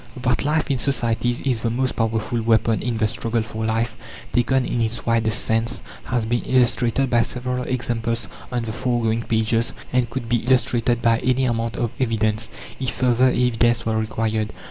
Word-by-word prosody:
That 125 0 +1
life 150 +1 +1
in 135 - 0
societies 120 -2 0
is 125 -5 0
the 115 - 0
most 130 +3 0
powerful 115 +1 -1
weapon 115 0 +2
in 120 -2 -2
the 110 - +2
struggle 115 +1 -1
for 110 0 -5
life, 115 +1 0 0.4
taken 125 +1 +2
in 120 - -1
its 115 +1 -2
widest 115 -1 +2
sense, 115 +2 0 0.2
has 120 -3 -1
been 120 +1 0
illustrated 125 0 +2
by 120 -1 +5
several 125 +2 -2
examples 115 -2 -2 0.2
on 120 -2 -1
the 110 -1 -4
foregoing 115 -2 0
pages, 115 +1 0 0.2
and 125 -2 +2
could 115 -1 -4
be 120 +1 +2
illustrated 120 -1 +1
by 115 -1 +4
any 130 +1 +1
amount 115 -1 -1
of 120 -2 -1
evidence, 110 -3 0 0.3
if 130 -1 0
further 125 0 +3
evidence 120 -2 +2
were 110 -1 0
required. 110 0 -1
115 Hz, 175 wpm, -22 LUFS, 115-125 Hz, 0.4 s, by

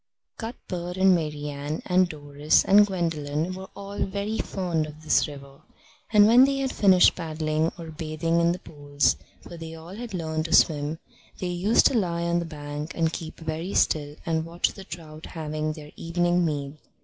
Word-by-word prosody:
Cuthbert 180 -6 -5
and 190 0 +5
Marian 150 -2 -3
and 185 -1 +3
Doris 145 -1 +1
and 205 +1 +6
Gwendolen 165 -3 -2
were 190 +1 -8
all 200 0 -7
very 200 +3 -3
fond 170 -5 -1
of 155 +1 -12
this 155 - +3
river, 140 -1 -11 0.5
and 210 -2 +7
when 235 +4 +7
they 275 0 0
had 270 -1 -1
finished 190 -3 +5
paddling 155 -1 -1
or 165 -2 -8
bathing 160 +1 -1
in 170 0 +3
the 175 - -2
pools 145 -4 0 0.3
(for 170 - -10
they 165 0 -7
had 165 - -9 0.4
all - - -2
learnt 160 -1 -2
to 165 - -2
swim) 150 0 +3 0.4
they - - -3
used 180 +5 +3
to - - +5
lie 175 -7 0
on 170 0 +1
the 170 - -3
bank 150 0 -6
and 165 -1 +1
keep 160 -1 -6
very 160 +4 -4
still 145 -1 +1
and 160 -1 0
watch 170 +1 -1
the 195 - -11
trout 160 -3 -9
having 155 -1 -3
their 150 -1 -11
evening 175 +1 +1
meal. 145 -3 -2
165 Hz, 180 wpm, -26 LUFS, 155-180 Hz, 0.5 s, and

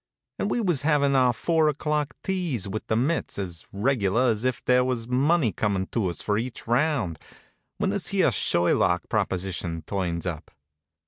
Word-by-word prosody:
And 200 - 0
we 240 - 0
was 175 - +1
havin' 145 -2 +2
our 130 -2 +5
four 160 +4 +1
o'clock 150 0 -1
teas 175 - -2
with 105 +3 -5
the 110 - +1
mitts, 140 +9 0
as 90 -4 -5
reg'lar 115 +1 +2
as 110 +1 -3
if 130 -1 -1
there 125 0 +4
was 125 -3 -2
money 135 +1 +2
comin' 100 -3 -1
to 105 -6 0
us 85 - -5
for 105 0 +1
each 120 +1 -6
round, 120 - +1 0.6
when - - 0
this - - -1
here - - +2
Sherlock 90 0 +2
proposition 90 -5 -2
turns 90 -4 -2
up. 85 -3 -5
120 Hz, 170 wpm, -25 LUFS, 95-140 Hz, 0.6 s, our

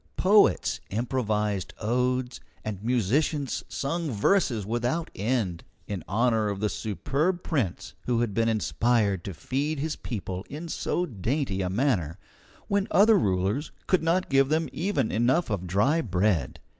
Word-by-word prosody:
Poets 195 - +4
improvised 105 -4 -1
odes, 125 +2 0 0.3
and 105 -2 -5
musicians 130 - 0
sung 145 +7 -2
verses 120 - +1
without 120 +9 -1
end, 105 -5 -1 0.2
in 100 -3 -5
honour 110 0 +2
of 100 -1 -3
the 105 +1 0
superb 145 - -1
prince 130 - -2
who 120 -2 +2
had 115 -4 -1
been 115 +2 +2
inspired 110 -3 +1
to 95 - -5
feed 145 - -2
his 150 +2 -2
people 95 -5 -5
in 155 +4 -6
so 175 +2 -1
dainty 115 - -2
a 90 - -1
manner, 95 - 0 0.5
when 200 0 +1
other 215 +3 +6
rulers 100 - 0
could 185 - +2
not 170 +3 +1
give 135 -1 +3
them 160 +1 +1
enough 140 - +1
even 110 - -3
of 90 -2 -3
dry 115 - +2
bread. 95 - 0
120 Hz, 145 wpm, -27 LUFS, 100-150 Hz, 0.5 s, other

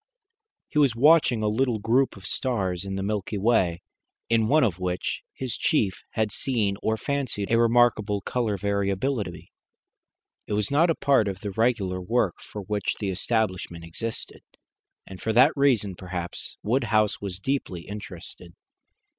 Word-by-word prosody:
He 150 - 0
was 135 -6 +4
watching 135 -4 +5
a - - +2
little 120 +2 +1
group 115 +3 +1
of 95 - -13
stars 95 -8 -1
in 95 0 -4
the 95 - -2
Milky 105 +1 -2
Way, 95 -5 +2 0.5
in 115 -1 +3
one 155 +5 +4
of 95 -7 0
which 90 -1 -2
his 130 -3 -4
chief 105 -11 +1
had 110 -2 0
seen 110 -5 0
or 110 0 0
fancied 130 -7 -2
a 115 - +4
remarkable 115 -3 +3
colour 115 -4 -1
variability. 100 +1 -2 1.0
It - - -3
was 105 +2 0
not 160 +5 +4
a 165 - +2
part 135 -7 +3
of 95 -1 -4
the 100 - -4
regular 100 -4 0
work 105 -1 0
for 105 - -8
which 105 0 -2
the 100 -2 -1
establishment 95 -4 -1
existed, 110 +7 -5 0.6
and 95 -1 -10
for 110 - -1
that 130 +6 +6
reason 125 -9 +2
perhaps 90 -1 -6
Woodhouse 110 -3 +1
was 95 -3 -5
deeply 100 -7 -2
interested. 90 -4 -8
105 Hz, 155 wpm, -26 LUFS, 95-120 Hz, 1.0 s, that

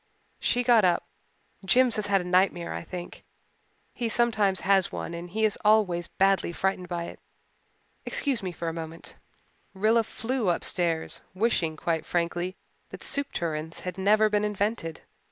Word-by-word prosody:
She 245 - +1
got 235 -3 +5
up. 180 -2 +2 0.6
"Jims 245 +5 +4
has 210 -1 -1
had 195 -1 +3
a - - -5
nightmare, 180 -1 +1
I - - -4
think. 175 +1 -8 0.7
He 235 -2 -2
sometimes 215 -5 +2
has 195 -1 +3
one - - -5
and 170 +1 -6
he 220 +4 +1
is 210 - 0
always 205 -5 +3
badly 195 -2 +2
frightened 185 +1 -1
by 175 -1 -2
it. - - -8 0.8
Excuse 275 -5 0
me 185 -2 -3
for 170 0 -5
a 165 - -1
moment." 165 0 -8 0.6
Rilla 220 +4 +3
flew 225 -1 -2
upstairs, 170 -1 -1
wishing 185 -7 +1
quite 165 -1 -1
frankly 175 +1 -1 0.3
that - - -9
soup 280 0 -1
tureens 160 -1 -3
had 180 0 -5
never 215 +3 +4
been 210 0 +1
invented. 205 -5 -2
190 Hz, 155 wpm, -27 LUFS, 170-215 Hz, 0.8 s, got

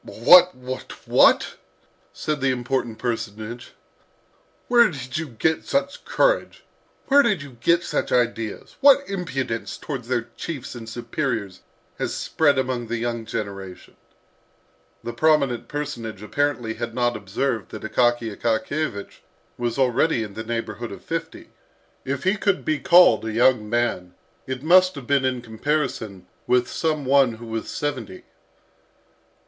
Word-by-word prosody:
"What, 180 +10 +6
what, 130 0 -7
what!" - - +4 0.5
said 150 -2 -3
the 135 - +2
important 125 -2 -2
personage. 115 0 -5 0.9
"Where 240 -3 +5
did 130 -2 -5
you 160 - -4
get 150 +6 0
such 275 0 -2
courage? - - +1 0.4
Where 280 +1 +6
did 210 - +1
you 135 -4 -13
get 170 +6 +3
such - - -2
ideas? 115 -3 -1
What 280 0 +6
impudence 135 - -3
towards 130 -6 -6
their 120 -2 -1
chiefs 140 -7 -6
and 115 -2 -8
superiors 115 -4 -3 0.4
has - - -2
spread 145 -4 +2
among 130 -2 -1
the 120 +1 -2
young 115 -1 -3
generation!" 95 -4 -6 1.1
The 120 - -5
prominent 140 -7 +2
personage 120 -8 -5
apparently 125 -2 -1
had 115 0 -5
not 120 -1 +1
observed 110 +2 -2
that - - -9
Akaky 120 -3 +1
Akakiyevich 115 0 -2 0.4
was 120 0 -3
already 130 0 +2
in 105 -2 -8
the 110 - -6
neighbourhood 115 0 -4
of - - -10
fifty. - - -5 0.5
If 135 0 -3
he 190 +3 +2
could 200 -2 0
be 155 -1 0
called 180 -7 +6
a 110 - -3
young 115 -1 +3
man, 105 -6 -1 0.3
it 130 0 -4
must 185 +2 +5
have 140 -3 -8
been 140 0 +2
in 125 -2 -1
comparison 110 -5 -3 0.2
with 125 -1 +3
some 155 -3 -1
one 135 -2 +4
who 115 +1 -11
was 115 0 -5
seventy. 125 -10 -4
125 Hz, 140 wpm, -23 LUFS, 115-150 Hz, 1.1 s, What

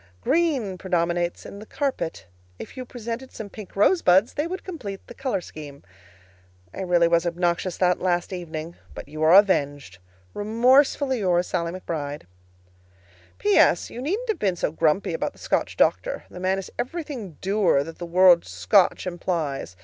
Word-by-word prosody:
Green 275 - 0
predominates 175 -1 -1
in 200 - -9
the 215 - -10
carpet. 270 - -3 0.3
If - - -10
you 255 -1 -6
presented 240 +1 -6
some 205 -3 -8
pink 210 -4 -11
rosebuds, 200 - +4
they 295 +3 -1
would 370 +2 -5
complete 210 - -7
the - - -11
color 260 -6 -2
scheme. 145 -4 -11 0.9
I - - -6
really 175 -2 +3
was 170 0 +3
obnoxious 175 +1 -1
that 180 -1 +2
last 175 0 0
evening, 165 -2 -6 0.2
but - - -8
you 155 +2 -8
are 160 +3 +6
avenged. 145 - +2 0.3
Remorsefully 255 +5 +3
yours, 180 -3 +2
SALLIE 170 -2 -2
McBRIDE. 150 -4 -5 1.1
P.S. 200 - +3
You 245 - -7
needn't 410 - -2
have 420 -7 0
been 190 -3 +1
so 165 - -1
grumpy 160 +4 +1
about - - -2
the - - -22
Scotch - - -1
doctor. - - +1
The 180 - -9
man 185 +1 0
is 195 - -6
everything 255 - -5
dour 195 -7 +2
that 165 +2 -10
the 175 - -5
word 175 0 +6
"Scotch" 200 -4 +2
implies. 165 - -3
185 Hz, 160 wpm, -24 LUFS, 170-235 Hz, 1.1 s, are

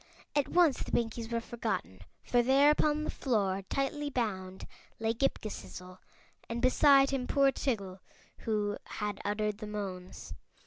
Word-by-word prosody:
At 290 -2 +2
once 340 -6 +3
the - - -5
Pinkies 230 0 -1
were 230 - +1
forgotten, 220 - -4 0.2
for 245 - +3
there 270 +4 +5
upon 300 0 +1
the - - -2
floor, 200 -7 0
tightly 290 +2 -1
bound, 190 -8 -3 0.3
lay 225 0 0
Ghip 275 +4 +1
Ghisizzle, 180 - -8 0.5
and 230 +1 -2
beside 275 +2 +5
him 260 -2 -2
poor 275 -1 +4
Tiggle, 200 -10 -3 0.4
who 210 -2 -1
had 210 -1 -4
uttered 210 0 -1
the 215 - -6
moans. 190 -3 -6
225 Hz, 145 wpm, -31 LUFS, 205-270 Hz, 0.5 s, there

